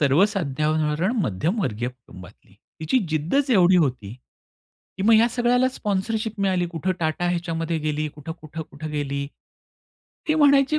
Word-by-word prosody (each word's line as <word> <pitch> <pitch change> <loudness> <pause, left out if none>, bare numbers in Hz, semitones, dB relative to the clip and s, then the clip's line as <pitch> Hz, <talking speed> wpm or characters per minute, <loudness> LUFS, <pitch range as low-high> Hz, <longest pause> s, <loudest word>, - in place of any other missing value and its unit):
सर्वसाधारण 155 - +1
मध्यमवर्गीय 125 - -1
कुटुंबातली. 100 -7 -15 0.3
तिची 160 +12 +2
जिद्दच 170 - 0
एवढी 185 -5 +5
होती. 125 - 0 0.8
की 190 - -3
मग 225 +2 +5
या 230 +2 +5
सगळ्याला 245 +1 +2
स्पॉन्सरशिप 215 -1 -2
मिळाली. 185 -3 +1
कुठे 170 +2 -2
टाटा 165 +2 0
ह्याच्यामध्ये 165 -1 -2
गेली 150 0 -2
कुठं-कुठं-कुठं 155 0 -8
गेली. 140 -1 -2 1.0
ती 310 - +3
म्हणायची, 285 0 +4
165 Hz, 115 wpm, -23 LUFS, 150-210 Hz, 1.0 s, एवढी